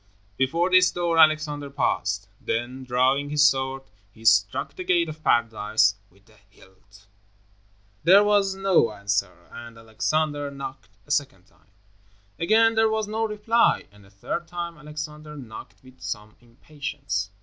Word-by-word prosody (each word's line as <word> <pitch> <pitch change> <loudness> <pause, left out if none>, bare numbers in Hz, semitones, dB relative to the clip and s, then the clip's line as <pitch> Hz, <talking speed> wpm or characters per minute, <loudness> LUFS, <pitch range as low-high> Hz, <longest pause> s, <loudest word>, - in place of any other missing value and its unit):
Before 165 - 0
this 185 0 +6
door 170 -2 0
Alexander 155 -2 +3
paused. 100 -7 -1 0.2
Then, 120 +3 -3
drawing 130 +3 +1
his 150 0 +3
sword, 135 -2 +1 0.3
he 110 +2 -17
struck 100 -3 +3
the 185 - -6
Gate 175 -2 +2
of 155 0 -9
Paradise 110 -2 +2 0.2
with 100 +2 -27
the 110 -1 -23
hilt. 95 +2 -21 1.0
There 190 +5 +7
was 205 -2 +2
no 190 - +2
answer, 100 -3 -3
and 120 -1 -11
Alexander 145 +6 -2
knocked 140 0 -8 0.2
a 145 - -9
second 140 -11 -1
time. 100 -5 -30 0.7
Again 225 +6 +4
there 220 0 +3
was 220 -1 -1
no 220 +1 -1
reply, 220 +2 +1
and 105 0 -19
a 95 - -19
third 100 - -5
time 170 0 -5
Alexander 150 0 -8
knocked 115 -3 -11
with 130 0 -18
some 105 -2 -6
impatience. 120 -4 -5
140 Hz, 145 wpm, -24 LUFS, 110-170 Hz, 1.0 s, There